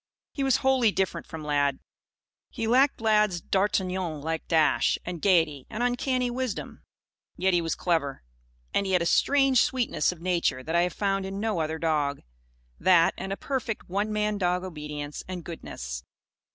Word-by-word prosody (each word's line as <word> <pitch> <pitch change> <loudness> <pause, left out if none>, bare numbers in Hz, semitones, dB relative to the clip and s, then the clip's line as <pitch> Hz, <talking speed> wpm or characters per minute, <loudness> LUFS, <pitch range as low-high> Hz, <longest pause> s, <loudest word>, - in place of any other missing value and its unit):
He 275 - -2
was 270 -2 +3
wholly 260 -5 +4
different 190 -1 -2
from 160 -2 -7
Lad. 145 -2 +1 0.7
He 230 - -4
lacked 255 +3 +3
Lad's 210 -5 +3
d'Artagnan 185 -3 0
like 160 +2 -3
dash 160 -3 +3
and 175 -2 -5
gaiety 165 -8 +2
and 225 +3 -3
uncanny 245 0 0
wisdom. 250 -3 -4 0.6
Yet 190 0 +2
he 175 - +3
was 165 -1 -1
clever. 155 -6 -1 0.5
And 200 - +1
he 190 - -1
had 180 -2 +3
a - - -3
strange 270 +5 +4
sweetness 245 - +1
of 180 - -10
nature 170 -7 0
that 160 - -4
I 170 - +5
have 180 0 0
found 195 -1 -1
in 195 +1 -5
no 215 -4 -1
other 160 0 -1
dog. 150 -3 0 0.6
That, 175 -3 +5
and 190 +1 -5
a 195 - -2
perfect 250 -8 -3
"one 205 +4 -1
man 210 -1 0
dog" 180 -1 +1
obedience 150 -4 -6
and 180 -2 -6
goodness. - - -7
185 Hz, 170 wpm, -27 LUFS, 160-215 Hz, 0.7 s, I